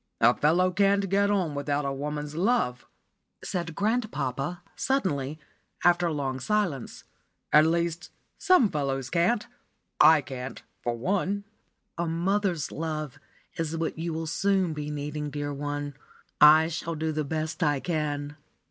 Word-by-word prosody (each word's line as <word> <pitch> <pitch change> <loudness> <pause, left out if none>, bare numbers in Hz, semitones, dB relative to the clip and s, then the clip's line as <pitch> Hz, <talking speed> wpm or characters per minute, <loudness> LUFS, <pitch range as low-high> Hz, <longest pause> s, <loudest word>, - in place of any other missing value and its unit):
"A 120 +2 +5
fellow 175 +5 +3
cannot 200 +1 +2
get 200 +1 +3
on 185 -7 +1
without 145 0 -1
woman's 150 +1 -4
love," 175 - 0 0.6
said 170 -3 -3
grandpapa, 180 - -1
suddenly, 155 - -1 0.5
after 175 0 +4
a - - -1
long 135 -3 -2
silence. 185 - -1 0.5
"At 155 +1 +7
least, 170 +1 -1 0.3
some 270 - +4
fellows 135 -4 -2
can't 185 +7 +2 0.5
I 155 0 +7
can't 130 -1 -7 0.2
for 120 -1 -2
one." 200 +8 -1 0.6
"A 170 - 0
mother's 175 0 0
love 155 -3 -4 0.4
is 165 0 -2
what 165 0 -2
you 170 +1 -2
will 160 0 -3
soon 185 +1 +1
be 150 -1 -5
needing, 150 0 -4
dear 145 0 -4
one. 145 0 -4 0.5
I 155 +2 +8
shall 165 0 -4
do 160 +1 -1
the 155 0 -1
best 155 +1 -3
I 145 -3 +2
can." 145 -2 -2
160 Hz, 140 wpm, -27 LUFS, 145-180 Hz, 0.6 s, I